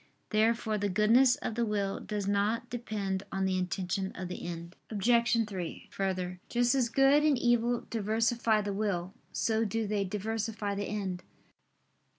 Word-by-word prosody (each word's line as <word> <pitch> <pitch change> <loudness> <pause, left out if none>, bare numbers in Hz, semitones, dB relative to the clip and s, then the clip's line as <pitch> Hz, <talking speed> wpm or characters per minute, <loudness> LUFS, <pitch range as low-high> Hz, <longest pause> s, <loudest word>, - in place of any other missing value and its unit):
Therefore 220 0 +2
the 205 0 0
goodness 230 +6 +5
of - - -4
the 235 +2 0
will 205 -3 -1
does 205 -2 -4
not 210 +4 0
depend 205 -5 -2
on 195 0 0
the 190 0 +1
intention 185 +1 -2
of 185 -1 -5
the 180 - -6
end. 170 +1 -7
Obj. 230 +1 +2
3: 185 -5 -6
Further, 185 -2 -2
just 245 +1 +2
as 255 -4 +2
good 270 +4 +5
and 300 -3 +3
evil 240 0 +2
diversify 225 0 +1
the 205 -1 -3
will, 195 -3 -2 0.2
so 225 0 +1
do 225 +1 -1
they 205 -1 0
diversify 210 +1 -2
the 200 0 -2
end. 190 -4 -3
210 Hz, 160 wpm, -30 LUFS, 195-230 Hz, 0.2 s, goodness